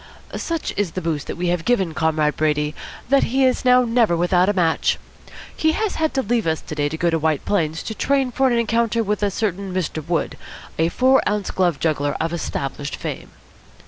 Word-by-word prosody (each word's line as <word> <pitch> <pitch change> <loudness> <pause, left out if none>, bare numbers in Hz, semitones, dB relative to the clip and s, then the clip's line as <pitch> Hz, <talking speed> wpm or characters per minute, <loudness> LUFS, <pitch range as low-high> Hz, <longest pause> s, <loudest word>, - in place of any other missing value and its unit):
"Such 330 -2 -3
is 195 -5 -1
the 185 - -3
boost 160 -4 -3
we 175 +1 -2
have 175 -1 0
given 190 -7 +1
Comrade 155 -1 +1
Brady, 150 -1 0 0.4
that 275 0 +4
he 265 +3 +2
is 255 - +1
now 250 0 +5
never 230 -7 +2
without 180 +2 +3
a - - +2
match. 170 -4 +1 0.6
He 315 0 +2
has 430 +1 -1
had 315 -1 0
to 265 - +1
leave 225 -2 0
us 160 -1 +1
to - - -8
day 145 -1 0
to 160 - -5
go 170 +1 +1
to 165 - +1
White 155 -2 0
Plains 165 -5 0
to 220 - -4
train 270 +2 +1
for 265 +2 +2
an 240 -2 +2
encounter 230 0 +1
with 210 0 -1
a 205 - +2
certain 195 -1 -2
Mr. 175 -4 -2
Wood, 165 0 -2 0.4
a 165 +1 +3
four 260 +8 +4
ounce 205 -1 -2
glove 175 -6 +1
juggler 145 -3 0
of 165 +1 -1
established 140 -3 -4
fame." - - -6
185 Hz, 210 wpm, -21 LUFS, 160-235 Hz, 0.6 s, now